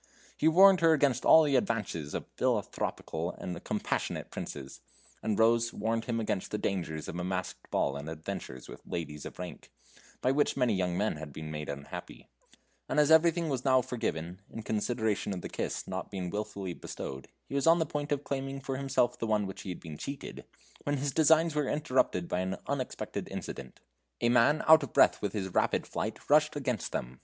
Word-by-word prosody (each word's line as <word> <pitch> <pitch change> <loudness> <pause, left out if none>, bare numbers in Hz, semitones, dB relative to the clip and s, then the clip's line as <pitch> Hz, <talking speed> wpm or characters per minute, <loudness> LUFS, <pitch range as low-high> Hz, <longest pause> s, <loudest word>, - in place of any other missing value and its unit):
He 155 - +2
warned 190 +3 +7
her 165 -1 +6
against 140 -5 +2
all 160 - +8
the 145 -3 +2
advances 105 - -1
of - - -3
philanthropical 80 +2 -1
and 90 -1 -6
compassionate - - -2
princes 70 -2 -7 0.4
and 110 -2 0
Rose 115 +1 +4
warned 115 0 -1
him 115 -2 -1
against 105 -3 -2
the 105 - -2
dangers 85 -7 -2
of 85 - -5
a - - -2
masked 90 0 -4
ball 70 - +1
and 70 +2 -5
adventures 80 -5 -6
with - - -10
ladies 75 -3 -5
of - - -11
rank, 90 -1 -8 0.5
by 130 - +2
which 145 +1 +2
many 125 -4 +3
young 90 -2 0
men 105 -4 0
have 75 -1 -7
been 80 +2 -7
made 75 0 -5
unhappy 70 0 -8 0.6
and - - +2
as 150 +1 +4
everything 165 +1 +5
was 130 -4 -1
now 130 -1 +5
forgiven, 90 -7 -3
in 115 - -7
consideration 110 -1 -1
of 90 - -5
the - - -6
kiss - - -3
not - - -4
been 95 -3 -4
wilfully 100 -3 -4
bestowed, 65 -4 -7 0.2
he - - -9
was 140 +2 +1
on 165 +1 +7
the 160 - +1
point 145 0 -4
of 145 0 0
claiming 135 0 -3
for 135 -1 -4
himself 135 -3 +1
the 115 - -2
one 105 -1 +2
of - - -3
which 95 - -7
he - - -7
had 90 - -5
been 75 -2 -9
cheated, 140 0 -6 0.4
when 145 0 -1
his 140 +1 -1
designs 160 +2 +4
were 150 -2 0
interrupted 130 - +1
by 90 - -1
an 95 +1 -2
unexpected - - -3
incident. 65 -2 -7 0.4
A 120 - +2
man 125 +6 +4
out 160 -1 +9
of - - -6
breath - - +5
with - - -2
his 95 -3 -2
rapid - - +2
flight - - -4
rushed 150 +1 +4
against 125 - -2
them. 60 +1 -4
115 Hz, 200 wpm, -30 LUFS, 90-140 Hz, 0.6 s, out